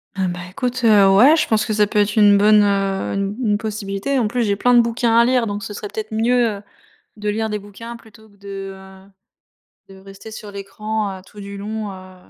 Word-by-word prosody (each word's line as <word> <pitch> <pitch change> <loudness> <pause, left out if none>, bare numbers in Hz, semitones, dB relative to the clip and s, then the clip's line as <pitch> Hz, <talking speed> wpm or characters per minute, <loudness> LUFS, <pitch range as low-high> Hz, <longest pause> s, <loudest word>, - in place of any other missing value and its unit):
Ah 190 -1 -1
bah, 175 0 -4
écoute, 250 +5 -3
heu, 205 -3 +6
ouais, 265 +10 +7
je 330 - +1
pense 220 -1 +1
que 215 - -2
ça 210 0 +3
peut 210 +1 -1
être 205 0 +1
une 205 -2 +6
bonne, 210 +1 +5
heu, 195 -1 0
une 200 +1 -2
une 205 -1 +2
possibilité. 215 +3 -3
En 235 -4 +1
plus, 240 +3 -1
j'ai 205 -2 +1
plein 245 +5 +2
de 240 - +7
bouquins 230 0 0
à 235 - +7
lire, 250 -1 +2
donc 205 -1 -4
ce 205 - -7
serait 205 - -6
peut-être 215 +1 -6
mieux, 230 0 +1
heu, - - -12 0.6
de 210 0 -4
lire 220 +1 -1
des 210 - -2
bouquins 210 +4 -10
plutôt 220 -1 -18
que 200 - -24
de, 195 -1 -7
heu, 190 0 -15 0.8
de 195 0 -14
rester 195 +3 -12
sur 215 -1 -9
l'écran, 200 +1 -4
heu, - - -15
tout 205 - -14
du 200 0 -8
long, 210 0 -5
heu, 185 0 -13
210 Hz, 235 wpm, -20 LUFS, 200-220 Hz, 0.8 s, ouais